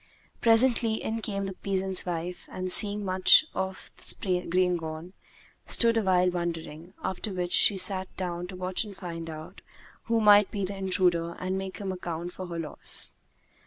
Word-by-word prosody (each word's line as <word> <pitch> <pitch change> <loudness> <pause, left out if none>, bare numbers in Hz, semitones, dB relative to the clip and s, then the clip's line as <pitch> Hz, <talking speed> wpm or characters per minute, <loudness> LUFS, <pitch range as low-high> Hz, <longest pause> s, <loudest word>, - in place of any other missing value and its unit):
Presently, 230 -1 +4
in 225 +1 -3
came 200 -2 -3
the 195 - -4
peasant's 190 -1 -2
wife 175 +1 -4
and, 185 0 -3
seeing 205 +1 +2
much 185 +10 +6
of 190 0 -4
the 180 -2 -2
grain 180 0 +2
gone, 160 +2 -6 0.5
stood 230 -1 +3
awhile 185 -4 +3
wondering; 170 0 -5
after 190 +3 -3
which 180 -1 -3
she 200 - +6
sat 190 0 -2
down 180 -1 -3
to 185 - -8
watch 185 +2 -1
and 205 -3 -11
find 165 -3 -6
out 160 +4 -9 0.4
who 230 -1 +1
might 205 -2 +6
be 200 -2 -2
the 200 +2 -5
intruder 180 -3 +1
and 185 +1 -3
make 190 0 -5
him 195 -2 -4
account 175 -1 -5
for 185 - -7
her 170 -1 -6
loss. 155 -3 0
185 Hz, 165 wpm, -28 LUFS, 175-200 Hz, 0.5 s, much